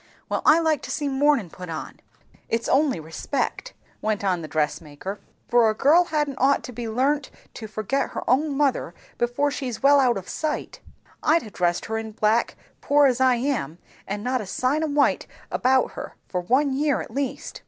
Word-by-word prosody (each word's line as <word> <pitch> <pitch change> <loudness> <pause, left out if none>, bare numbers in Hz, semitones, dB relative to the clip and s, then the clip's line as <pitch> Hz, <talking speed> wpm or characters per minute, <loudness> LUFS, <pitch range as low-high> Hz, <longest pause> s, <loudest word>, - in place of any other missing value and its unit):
"Well - - -1
I 305 - +8
like 320 -3 +1
to - - -8
see 295 -2 -2
mournin' 270 - +2
put 180 -2 -9
on, 160 -1 -6
if - - -35 0.3
it's 230 0 -1
only 275 - +2
respect," 165 - -3 0.3
went 215 -2 -1
on 185 -3 +1
the 155 - -6
dress 155 0 -1
maker; 165 +6 -7 0.3
"and 240 -1 +5
a 215 - +1
girl 315 +9 +5
hadn't 295 -5 -1
ought 275 +2 +3
to 250 - -7
be 235 -1 -5
learnt 270 +5 0 0.2
to 220 - -7
forget 215 +6 -2
her - - -6
own 280 +2 +2
mother, 270 - 0 0.2
before 245 +5 +1
she's 255 -5 -5
well 285 +1 +6
out 250 -4 +3
of 190 - -7
sight. 310 -1 -3 0.4
I'd 325 +1 +3
ha' 215 - -10
dressed 175 -1 0
her 220 0 -2
in 220 -1 -7
black, 215 +2 +1 0.2
poor 290 0 +4
as 260 -2 +2
I 260 -1 +5
am, 240 - -2 0.3
and 205 +1 -4
not 255 0 0
a 205 - -7
sign 260 +10 0
o - - 0
white 290 -1 +2 0.2
about 260 0 +2
her, - - -8
for 180 - -2
one 265 +9 +2
year 285 +1 +1
at - - -9
least. 275 -2 -4
255 Hz, 200 wpm, -24 LUFS, 215-285 Hz, 0.4 s, I